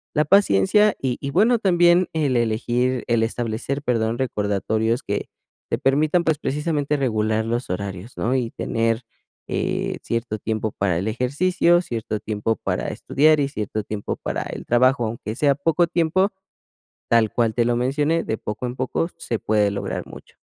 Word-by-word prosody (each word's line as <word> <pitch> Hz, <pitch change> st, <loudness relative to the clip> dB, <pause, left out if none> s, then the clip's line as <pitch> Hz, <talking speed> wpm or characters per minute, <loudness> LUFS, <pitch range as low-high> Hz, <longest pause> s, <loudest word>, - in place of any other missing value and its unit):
la 150 Hz, 0 st, +3 dB
paciencia, 200 Hz, -, +4 dB
y 130 Hz, -2 st, -1 dB
y 140 Hz, -, -3 dB
bueno, 225 Hz, -, +4 dB
también 175 Hz, -2 st, +4 dB
el 150 Hz, -5 st, +1 dB
elegir 120 Hz, +2 st, 0 dB
el 115 Hz, -1 st, +2 dB
establecer, 120 Hz, +4 st, -2 dB
perdón, 115 Hz, -3 st, 0 dB
recordatorios 110 Hz, -1 st, 0 dB
que -, -, -3 dB, 0.4 s
te -, -, 0 dB
permitan, 150 Hz, +6 st, +2 dB
pues, 160 Hz, -2 st, +1 dB
precisamente 150 Hz, 0 st, -1 dB
regular 110 Hz, -4 st, 0 dB
los 120 Hz, +2 st, -2 dB
horarios, 95 Hz, +4 st, -5 dB
¿no? 125 Hz, +4 st, 0 dB
Y 120 Hz, -3 st, -1 dB
tener, 115 Hz, +1 st, -1 dB, 0.4 s
eh, -, -, -2 dB
cierto 115 Hz, -2 st, -2 dB
tiempo 110 Hz, 0 st, -2 dB
para 95 Hz, -4 st, 0 dB
el 95 Hz, -, -3 dB
ejercicio, 165 Hz, +9 st, +2 dB
cierto 110 Hz, -8 st, -4 dB
tiempo 110 Hz, +1 st, -2 dB
para -, -, -2 dB
estudiar 155 Hz, +2 st, +2 dB
y 140 Hz, -, +1 dB
cierto 110 Hz, -3 st, -3 dB
tiempo 105 Hz, 0 st, -4 dB
para -, -, -3 dB
el -, -, -7 dB
trabajo, 125 Hz, +1 st, +3 dB
aunque 110 Hz, 0 st, -5 dB
sea 140 Hz, +1 st, +3 dB
poco 165 Hz, +4 st, +2 dB
tiempo. 175 Hz, +4 st, +1 dB, 0.8 s
Tal 115 Hz, -2 st, +3 dB
cual 115 Hz, -2 st, +1 dB
te 120 Hz, -, +2 dB
lo 120 Hz, 0 st, +1 dB
mencioné, 145 Hz, +6 st, +1 dB
de 110 Hz, -, -2 dB
poco 105 Hz, +4 st, -4 dB
en 125 Hz, +1 st, -5 dB
poco 130 Hz, +6 st, -1 dB
se 115 Hz, -7 st, -2 dB
puede 105 Hz, -1 st, +2 dB
lograr 100 Hz, -, -4 dB
mucho. -, -, -13 dB
120 Hz, 165 wpm, -22 LUFS, 110-150 Hz, 0.8 s, paciencia